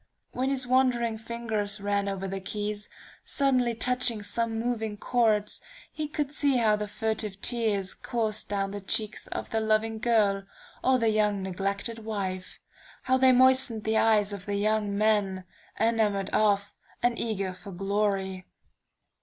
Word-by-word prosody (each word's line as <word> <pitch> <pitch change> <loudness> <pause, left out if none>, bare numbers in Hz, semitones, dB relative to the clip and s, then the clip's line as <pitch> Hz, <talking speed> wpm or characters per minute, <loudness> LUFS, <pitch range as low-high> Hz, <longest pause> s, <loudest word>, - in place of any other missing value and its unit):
When 260 +2 -1
his 265 -2 +1
wandering 245 -3 +2
fingers 220 -3 -2
ran 200 0 0
over 195 0 -3
the 195 0 -4
keys, 210 +2 -4 0.3
suddenly 255 -4 +1
touching 245 -2 +2
some 230 +2 -2
moving 225 -3 -2
chords, 215 -3 +1 0.3
he 310 -1 -4
could 290 -1 -3
see 285 -3 +2
how 220 -3 +3
the 210 0 -4
furtive 215 -2 -2
tears 210 -5 0
coursed 220 -3 -2
down 195 -1 -1
the 205 0 -6
cheeks 215 +2 -1
of - - -5
the 225 - +1
loving 220 0 +1
girl, 210 -4 +2 0.4
or 260 0 +4
the 230 -2 +2
young 210 -2 +1
neglected 200 +4 -3
wife; 190 -4 -4 0.4
how 260 0 +2
they 260 0 +6
moistened 255 -3 +4
the 220 0 +1
eyes 210 -2 +3
of 200 0 -7
the 205 - -1
young 210 0 0
men, 205 -3 +1 0.4
enamored 215 -3 +1
of, 200 -2 +2 0.3
and 240 -1 +2
eager 200 -5 -2
for 185 +2 -11
glory. 195 -1 -1
215 Hz, 150 wpm, -28 LUFS, 200-235 Hz, 0.4 s, they